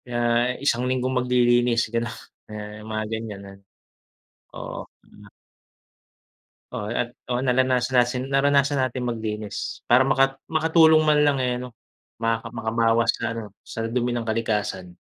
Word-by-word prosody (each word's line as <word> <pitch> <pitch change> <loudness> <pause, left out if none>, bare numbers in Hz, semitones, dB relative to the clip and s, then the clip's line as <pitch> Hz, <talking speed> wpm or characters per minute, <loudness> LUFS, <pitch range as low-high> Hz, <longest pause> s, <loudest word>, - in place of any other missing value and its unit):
Kaya 120 -1 -4 0.5
isang 120 -3 +2
linggong 130 0 0
maglilinis, 120 -1 +3
ganun, 115 -1 -2 0.7
mga 110 0 -2
ganyan, 110 -3 -5
ah. - - -15 1.0
Oo, - - -6 0.2
hmm. - - -17 1.4
Oo 105 - -4
at 120 +2 -2 0.2
oo, 125 +1 -1
nalanasan 130 0 +2
natin 125 +1 +1
naranasan 140 0 +3
natin 130 -1 -1
maglinis, 110 -3 -4
para 130 +2 +6
maka 135 0 +2
makatulong 160 0 +4
man 150 -1 +4
lang, 145 -1 +3
eh, 125 -1 -1
ano, 125 -2 -9 0.4
maka 115 0 -1
makabawas 115 0 +1
sa 115 - -4
ano, 110 -3 -7
sa 115 - -6
dumi 120 0 0
ng 120 - -2
kalikasan. 105 -5 -2
120 Hz, 130 wpm, -24 LUFS, 115-130 Hz, 1.4 s, para